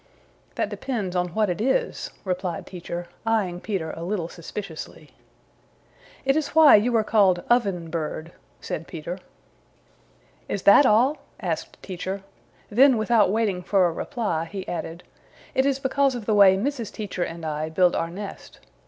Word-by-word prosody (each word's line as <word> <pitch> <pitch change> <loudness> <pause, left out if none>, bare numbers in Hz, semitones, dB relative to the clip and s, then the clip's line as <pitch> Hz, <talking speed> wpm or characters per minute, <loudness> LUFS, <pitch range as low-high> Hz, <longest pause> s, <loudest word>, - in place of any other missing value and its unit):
"That - - -1
depends 210 -9 -3
on 180 0 +1
what 215 -1 +2
it 180 +2 -2
is," 470 - 0 0.2
replied 180 -2 -3
Teacher, 175 -1 -6 0.2
eyeing 210 -6 0
Peter 180 -7 -3
a 165 - -8
little 175 -1 -2
suspiciously. 165 -4 -8 1.1
"It 270 +1 +3
is 315 0 -2
why 315 -2 +9
you 230 +3 +3
are 220 - +2
called 195 -5 +3
Oven 195 -9 +1
Bird," 160 0 -4 0.3
said 165 - -5
Peter. 170 +3 -6 1.3
"Is 200 - -3
that 225 +7 +7
all?" 250 +8 +4 0.2
asked - - -4
Teacher. 190 +1 -5 0.5
Then 260 +3 +6
without 220 -2 +3
waiting 205 -3 0
for 190 +1 +3
a 175 - +2
reply 205 - -2
he 190 +2 -7
added, 170 0 -5 0.5
"It 265 +1 +2
is 275 -1 +1
because 270 0 +1
of 235 -4 -6
the 215 - +1
way 195 -2 +7
Mrs. 240 0 -2
Teacher 205 -4 -5
and 165 -1 -3
I 155 0 -2
build 180 +2 +3
our 165 - -1
nest. 195 +3 -9
195 Hz, 155 wpm, -24 LUFS, 175-230 Hz, 1.3 s, why